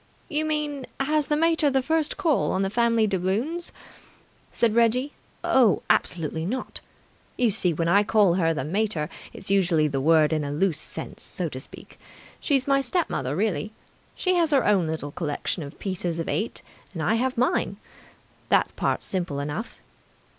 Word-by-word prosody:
"You 310 -1 0
mean 295 -3 -2
has 300 +2 +1
the 295 - +1
mater 325 -2 +3
the 265 -1 +1
first 315 +2 0
call 330 -8 +2
on 190 - +1
the 195 - -1
family 230 0 +3
doubloons?" 210 - -1 0.8
said 230 -2 +1
Reggie. 235 +4 +2 0.3
"Oh, 240 -7 +4
absolutely 160 -2 0
not! 250 +9 -3 0.6
You 240 -3 +3
see, 185 -3 +1
when 165 +1 -1
I 200 +4 +5
call 205 -3 +4
her 170 -2 +2
the 140 -5 -2
mater, 175 -3 -1 0.2
it's 190 - -7
using 170 -6 +3
the 135 -1 -1
word 155 +1 +4
in 155 -1 0
a 140 - -3
loose 160 +2 0
sense, - - -8
so - - -4
to - - -7
speak. - - -13 0.4
She's 275 -4 +1
my 275 0 +3
step 325 +6 -1
mother 135 +1 -2
really. 205 0 -1 0.4
She 370 - +1
has 340 -3 +3
her 275 -5 +3
own 195 -5 +3
little 155 -2 -4
collection 155 +2 -3
of 140 -1 -8
pieces 180 -3 -3
of 165 - -3
eight, 220 - -2 0.3
and 160 - -3
I 210 - +2
have 255 +2 0
mine. 255 +9 +1 0.7
That - - +2
part's - - -1
simple 175 -7 -2
enough." 150 +10 -4
210 Hz, 175 wpm, -25 LUFS, 165-270 Hz, 0.8 s, I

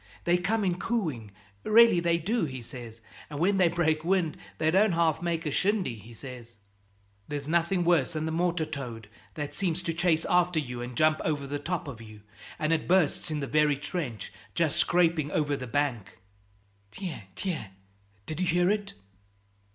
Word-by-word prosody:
They 175 - +3
come 210 +4 0
in 180 -2 0
cooing, 155 - -2 0.3
really 225 -4 +6
they 170 0 +2
do, 205 +5 0
he 130 -4 -6
says, 115 -1 -9 0.3
and 145 - -6
when 195 +4 +3
they 185 -2 +5
break 160 -2 +1
wind 175 -3 +1 0.2
they 160 0 +2
don't 195 +2 +4
half 165 -2 +2
make 170 -1 -1
a 150 - -1
shindy, 195 - +1
he 110 +1 -12
says." 120 -1 -10 0.7
"There's 145 -1 -4
nothing 170 +3 +2
worse 170 -3 +3
than 155 0 -2
the 160 - -2
mortar 170 0 0
toad, 125 -8 -7 0.3
that 145 -2 -4
seems 180 -2 -1
to 165 - -1
chase 170 -1 +2
after 180 -1 +3
you 125 -5 -2
and 120 -1 -6
jump 155 0 +3
over 145 -3 -1
the 145 +1 -3
top 165 +2 -3
of 120 -5 -7
you, 110 -2 -12 0.4
and 155 +1 +1
it 160 - -1
bursts 180 -2 +2
in 150 -1 -2
the - - -1
very 150 +1 +3
trench, 140 - -5 0.2
just 165 -3 +1
scraping 165 -4 +2
over 145 -1 0
the 130 -2 -6
bank." 120 -7 -1 0.7
"Tiens, 180 - -6
tiens, 175 - -3 0.6
did 155 - -5
you 185 - +1
hear 175 +2 +3
it?" 205 -1 -2
160 Hz, 180 wpm, -28 LUFS, 140-175 Hz, 0.7 s, really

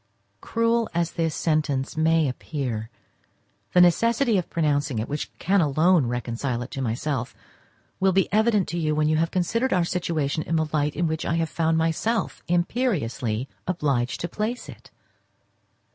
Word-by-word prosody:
Cruel 230 0 +1
as 170 -1 +1
this 165 -2 -1
sentence 150 -4 0
may 160 -1 +3
appear, 125 -4 -4 0.8
the 180 - +6
necessity 230 +7 +3
of 175 - -5
pronouncing 145 -5 0
it, 110 +2 -2
which 145 +1 -4
can 195 +2 +2
alone 155 0 +3
reconcile 120 +1 -2
it 125 - -10
to 135 - -4
myself, 125 +1 -2 0.6
will 190 0 +3
be 190 +1 +2
evident 215 -3 +3
to 170 - -2
you 155 -2 0
when 150 0 +2
you 155 0 +2
have 165 +1 +1
considered 230 +9 0
our 180 -2 +2
situation 160 -4 -1
in 165 - -2
the 160 -1 +2
light 150 -1 +1
in 175 - 0
which 160 0 -1
I 165 - 0
have 165 -1 0
found 165 -1 +1
myself 165 +8 0
imperiously 150 - 0 0.2
obliged 140 -9 0
to 175 - -1
place 215 +7 -3
it. - - -12
160 Hz, 160 wpm, -25 LUFS, 140-180 Hz, 0.8 s, the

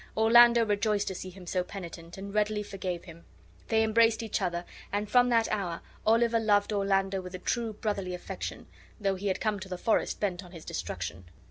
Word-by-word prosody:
Orlando 235 +1 +7
rejoiced 210 0 +1
to - - -4
see 185 0 -6
him 185 0 -12
so 180 +1 0
penitent, 170 -3 -9
and 200 +1 -7
readily 210 0 +1
forgave 185 -4 -4
him. 170 -1 -12 0.4
They 225 -1 +3
embraced 225 0 +3
each 220 -2 -2
other 175 -2 -1 0.3
and 205 +1 -1
from 245 +3 +4
that 230 -2 +3
hour 180 -6 -2 0.3
Oliver 230 +1 +4
loved 210 -1 +2
Orlando 195 -1 +1
with 180 0 -8
a - - -3
true 225 +4 -2
brotherly 200 -4 -2
affection, 180 - -6 0.3
though 200 -2 +1
he 195 +2 -4
had 190 - 0
come 215 -2 0
to 190 0 -8
the 180 - -4
forest 220 +5 +1
bent 190 -2 -1
on 180 0 -14
his 165 -2 -10
destruction. 85 +4 -5
200 Hz, 200 wpm, -29 LUFS, 185-220 Hz, 0.4 s, Orlando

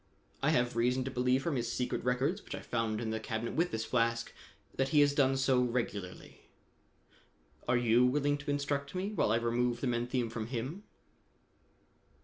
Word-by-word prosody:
I - - +2
have 120 -1 +1
reason 125 +2 +2
to 135 - -4
believe 125 +1 +1
from 150 -3 -1
his 120 -1 -2
secret 125 0 -2
records 130 - 0
which - - -6
I - - -7
found 115 -2 -1
in 115 -1 -3
the 110 - -2
cabinet 110 +1 -3
with 170 +2 +1
this 110 0 -3
flask 115 -1 0 0.4
that 135 0 0
he 150 +1 +5
has 145 0 +4
done 135 -2 +3
so 135 -1 +3
regularly. 115 -7 -3 1.3
Are 120 - +3
you 120 +1 +4
willing 145 +2 +1
to 140 - -7
instruct 145 +1 -2
me 190 +3 -2
while 205 - +1
I - - +4
remove 120 +1 0
the - - -3
menthium 120 -1 -1
from 110 -1 -4
him?" 135 - -5
125 Hz, 180 wpm, -32 LUFS, 115-140 Hz, 1.3 s, he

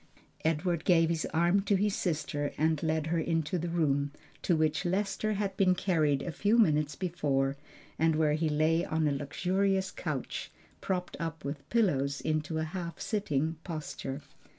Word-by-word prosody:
Edward 165 +1 0
gave 165 -2 +4
his 165 -1 -1
arm 175 +4 +3
to 200 +1 +2
his 205 +1 +1
sister 145 -4 -2
and 160 0 +2
led 160 -1 0
her 165 +1 0
into 165 +1 0
the 175 - -2
room, 145 -4 +1 0.3
to 175 - +2
which 155 -1 +1
Lester 195 +3 0
had 200 -1 -2
been 185 -3 +4
carried 155 -7 +1
a 175 - -3
few 205 +8 +2
moments 150 -8 +3
before, 140 -7 0 0.4
and 160 0 +3
where 155 -1 +3
he 155 +1 +1
lay 155 +3 +2
on 155 -2 0
a - - +2
luxurious 190 +7 0
couch, - - -4 0.3
propped 180 -2 -2
up 165 -2 -4
with 140 0 -5
pillows 140 - +1
into 155 0 -1
a 160 - 0
half 170 0 -5
sitting 160 -7 -1
posture. 150 -4 -5
160 Hz, 165 wpm, -30 LUFS, 150-180 Hz, 0.4 s, gave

